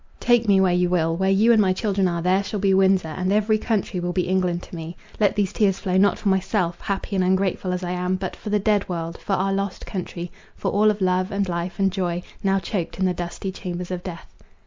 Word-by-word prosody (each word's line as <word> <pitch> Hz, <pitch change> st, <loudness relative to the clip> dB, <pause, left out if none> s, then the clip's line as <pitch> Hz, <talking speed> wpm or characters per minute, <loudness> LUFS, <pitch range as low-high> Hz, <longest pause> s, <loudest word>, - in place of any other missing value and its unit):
Take 240 Hz, -2 st, +3 dB
me 195 Hz, -2 st, +5 dB
where 185 Hz, -2 st, +3 dB
you 180 Hz, 0 st, +2 dB
will; 165 Hz, -2 st, +1 dB
where 190 Hz, +2 st, +1 dB
you 210 Hz, +5 st, +4 dB
and 220 Hz, -, +5 dB
my 190 Hz, -2 st, +3 dB
children 195 Hz, -1 st, 0 dB
are, 170 Hz, -1 st, -2 dB
there 185 Hz, +2 st, +2 dB
shall 205 Hz, +1 st, -4 dB
be 195 Hz, -1 st, +3 dB
Windsor, 190 Hz, -3 st, +3 dB
and 185 Hz, +4 st, -2 dB
every 215 Hz, +1 st, +2 dB
country 210 Hz, -5 st, -1 dB
will 175 Hz, 0 st, -2 dB
be 180 Hz, -1 st, 0 dB
England 180 Hz, -2 st, 0 dB
to -, -, -10 dB
me. 165 Hz, +1 st, -7 dB, 0.2 s
Let 205 Hz, -2 st, +3 dB
these 205 Hz, -1 st, 0 dB
tears 195 Hz, -3 st, +2 dB
flow 185 Hz, -3 st, -2 dB
not 200 Hz, +2 st, +4 dB
for -, -, -4 dB
myself, 190 Hz, -2 st, 0 dB
happy 200 Hz, 0 st, -3 dB
and 185 Hz, -, +2 dB
ungrateful 185 Hz, 0 st, 0 dB
as 180 Hz, 0 st, -3 dB
I 175 Hz, -, -3 dB
am, 180 Hz, +1 st, -1 dB
but 185 Hz, 0 st, -4 dB
for 215 Hz, -, -7 dB
the 210 Hz, -, +2 dB
dead 205 Hz, -1 st, +1 dB
world—for 170 Hz, +2 st, -4 dB
our 195 Hz, +1 st, +1 dB
lost 195 Hz, -1 st, -3 dB
country—for 175 Hz, -2 st, -6 dB
all 210 Hz, +1 st, +4 dB
of 210 Hz, -1 st, -1 dB
love, 185 Hz, 0 st, +1 dB
and 200 Hz, 0 st, 0 dB
life, 175 Hz, +1 st, -3 dB
and 195 Hz, -1 st, +2 dB
joy, 180 Hz, -2 st, -2 dB, 0.2 s
now 195 Hz, 0 st, +2 dB
choked 190 Hz, -2 st, -3 dB
in 190 Hz, -, +1 dB
the 185 Hz, -, +2 dB
dusty 175 Hz, +2 st, -5 dB
chambers 180 Hz, -1 st, -6 dB
of 180 Hz, -1 st, -3 dB
death." 175 Hz, -2 st, -9 dB
190 Hz, 240 wpm, -23 LUFS, 180-200 Hz, 0.2 s, me